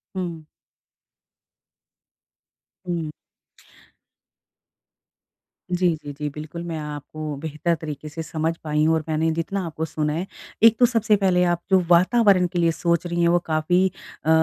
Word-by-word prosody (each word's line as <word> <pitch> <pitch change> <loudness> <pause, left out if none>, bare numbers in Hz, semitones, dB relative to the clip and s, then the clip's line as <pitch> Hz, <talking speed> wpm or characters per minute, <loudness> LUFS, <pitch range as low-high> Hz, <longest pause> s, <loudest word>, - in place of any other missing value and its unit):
हुँ। 170 -4 -4 2.4
हुँ। 165 -3 -2 2.6
जी, 180 -1 +2
जी, 145 - -6
जी। 150 +1 -4
बिल्कुल 155 +3 -7
मैं 170 -2 -4
आपको 150 0 -6
बेहतर 160 +2 -1
तरीके 150 -1 -6
से 160 +2 -6
समझ 160 +1 -1
पाई 150 -1 +1
हूँ 160 - +4
और 160 - -1
मैंने 155 +1 +1
जितना 170 +4 -2
आपको 160 -1 -4
सुना 150 -1 -2
है 170 +4 -2 0.4
एक 225 -1 +7
तो 245 - +7
सबसे 225 -3 +3
पहले 185 -3 +2
आप 175 -1 +1
जो 190 - +6
वातावरण 185 +1 +5
के 175 - 0
लिए 170 -1 +3
सोच 170 +1 0
रही 175 0 -1
हैं 170 - +4
वो 175 +1 +4
काफ़ी 165 +4 +2 0.4
अ, - - +1
165 Hz, 145 wpm, -23 LUFS, 155-180 Hz, 2.6 s, एक